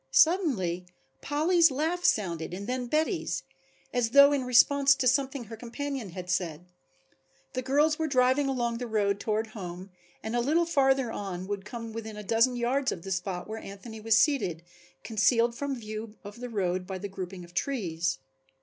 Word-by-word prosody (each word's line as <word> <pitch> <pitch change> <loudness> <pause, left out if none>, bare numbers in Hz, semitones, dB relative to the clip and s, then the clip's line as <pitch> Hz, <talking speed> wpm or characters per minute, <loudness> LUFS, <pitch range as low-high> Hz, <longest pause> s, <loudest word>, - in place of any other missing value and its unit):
Suddenly 190 - +2 0.3
Polly's 330 +4 +3
laugh 320 +6 -1
sounded 175 - 0
and 200 +2 -6
then 250 +1 -2
Betty's, 315 - 0 0.5
as 245 -2 +1
though 280 +3 +8
in 270 -3 0
response 275 +3 +5
to 265 -2 0
something 265 0 +1
her 225 0 -9
companion 250 0 -5
had 180 +1 -7
said. 175 -2 -2 0.9
The 255 - -2
girls 295 +4 +2
were 320 - 0
driving 260 +1 +3
along 240 -3 -1
the 245 - -4
road 200 -3 +1
toward 215 +1 -1
home 185 -2 -7 0.3
and 220 +2 -3
a - - +2
little 315 +7 +2
farther 270 -6 +2
on 185 -4 -5
would 200 0 -4
come 230 0 -7
within 220 -1 -6
a 210 - -6
dozen 230 +5 +3
yards 260 +3 0
of 165 - -6
the 195 - -6
spot 180 0 -3
where 220 +1 -5
Anthony 220 +3 -9
was 225 +1 +3
seated, 185 - +2 0.4
concealed 230 +2 +2
from 280 +3 -3
view 215 -1 -7
of 205 +2 -10
the 245 0 -6
road 185 -4 -1
by 190 - -4
the 200 +2 -5
grouping 185 -1 -7
of 175 0 -15
trees. 180 -9 -1
230 Hz, 175 wpm, -28 LUFS, 195-270 Hz, 0.9 s, though